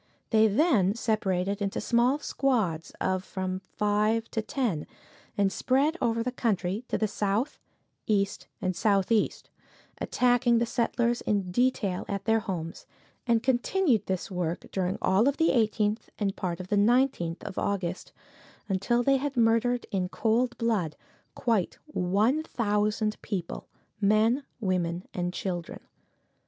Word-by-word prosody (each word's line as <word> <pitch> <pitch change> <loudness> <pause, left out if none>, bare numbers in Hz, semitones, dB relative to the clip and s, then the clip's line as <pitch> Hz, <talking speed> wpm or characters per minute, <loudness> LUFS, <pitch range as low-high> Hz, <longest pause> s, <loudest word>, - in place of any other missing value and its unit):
They 220 -1 +5
then 215 - +3
separated 200 -3 0
into 195 -1 -1
small 245 +4 +2
squads 220 - 0
of 185 0 0
from 185 -1 -3
five 210 +3 0
to 220 - -1
ten 215 - -2 0.5
and 200 -1 +2
spread 280 +5 +2
over 230 -1 +1
the 250 - -2
country 205 -4 -1
to - - -1
the 215 - +1
south, 210 +6 -1 0.5
east 200 -2 0 0.2
and 185 -1 0
southeast, 200 +3 +1 0.5
attacking 245 -1 +3
the 235 - +2
settlers 235 0 0
in 200 -4 -1
detail 210 -4 +1
at 200 -1 -4
their 225 0 +3
homes 180 -6 -5 0.4
and 230 -1 +3
continued 260 - +2
this 190 +1 -3
work 175 -2 -2
during 185 -1 -1
all 195 +6 +4
of 280 - +1
the 325 - +3
18th 215 -2 +1
and 200 -2 -1
part 175 -2 -3
of 185 0 -7
the 205 - +2
19th 210 -6 +2
of - - -5
August, 190 -3 -2 0.6
until 215 +5 +1
they 275 +2 +4
had 275 0 -3
murdered 235 +1 +2
in 185 -3 -1
cold 240 +4 +1
blood 210 -10 0 0.4
quite 225 -8 0
one 220 +2 +1
thousand 215 -5 -1
people 185 -5 -4 0.3
men, 215 +6 +3 0.2
women 180 -3 -1
and 175 -1 -2
children. 175 -2 -4
215 Hz, 140 wpm, -28 LUFS, 190-240 Hz, 0.6 s, They